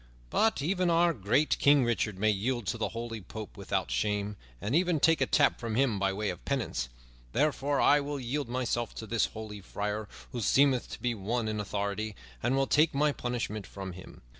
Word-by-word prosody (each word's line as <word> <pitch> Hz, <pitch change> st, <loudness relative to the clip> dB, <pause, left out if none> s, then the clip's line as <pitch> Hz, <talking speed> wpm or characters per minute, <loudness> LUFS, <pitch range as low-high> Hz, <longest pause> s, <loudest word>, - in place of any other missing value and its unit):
But 220 Hz, -10 st, +2 dB
even 180 Hz, +2 st, +1 dB
our 170 Hz, 0 st, +4 dB
great 120 Hz, +6 st, +1 dB
King 140 Hz, -2 st, +5 dB
Richard 110 Hz, -4 st, 0 dB
may 110 Hz, +2 st, +3 dB
yield 115 Hz, +3 st, -1 dB
to 115 Hz, -, -1 dB
the 110 Hz, -, 0 dB
holy 115 Hz, -1 st, -5 dB
Pope 110 Hz, +3 st, -8 dB
without 95 Hz, -2 st, -2 dB
shame, 105 Hz, 0 st, 0 dB, 0.2 s
and 105 Hz, -, -3 dB
even 175 Hz, -2 st, +3 dB
take 165 Hz, +2 st, +4 dB
a -, -, +3 dB
tap 145 Hz, -, +3 dB
from 115 Hz, -2 st, -3 dB
him 120 Hz, -5 st, +2 dB
by 95 Hz, 0 st, +2 dB
way 105 Hz, +1 st, -1 dB
of 90 Hz, -, -10 dB
penance; 110 Hz, -, -2 dB, 0.4 s
therefore 145 Hz, 0 st, +1 dB
I 145 Hz, -, +6 dB
will 145 Hz, 0 st, -3 dB
yield 130 Hz, +1 st, -2 dB
myself 120 Hz, -2 st, -1 dB
to 110 Hz, -, -6 dB
this 115 Hz, 0 st, +1 dB
holy 110 Hz, -2 st, -8 dB
friar, 105 Hz, +2 st, -3 dB, 0.2 s
who 120 Hz, -, -4 dB
seemeth 130 Hz, +4 st, +3 dB
to -, -, -7 dB
be 120 Hz, -1 st, +1 dB
one 110 Hz, +3 st, -2 dB
in 110 Hz, -1 st, -2 dB
authority, 100 Hz, +1 st, -2 dB, 0.3 s
and 120 Hz, +3 st, +1 dB
will 135 Hz, 0 st, +3 dB
take 150 Hz, +2 st, +3 dB
my 150 Hz, +1 st, +3 dB
punishment 120 Hz, -6 st, -3 dB
from 95 Hz, -1 st, -6 dB
him." 90 Hz, +1 st, -12 dB
115 Hz, 200 wpm, -30 LUFS, 105-140 Hz, 0.4 s, I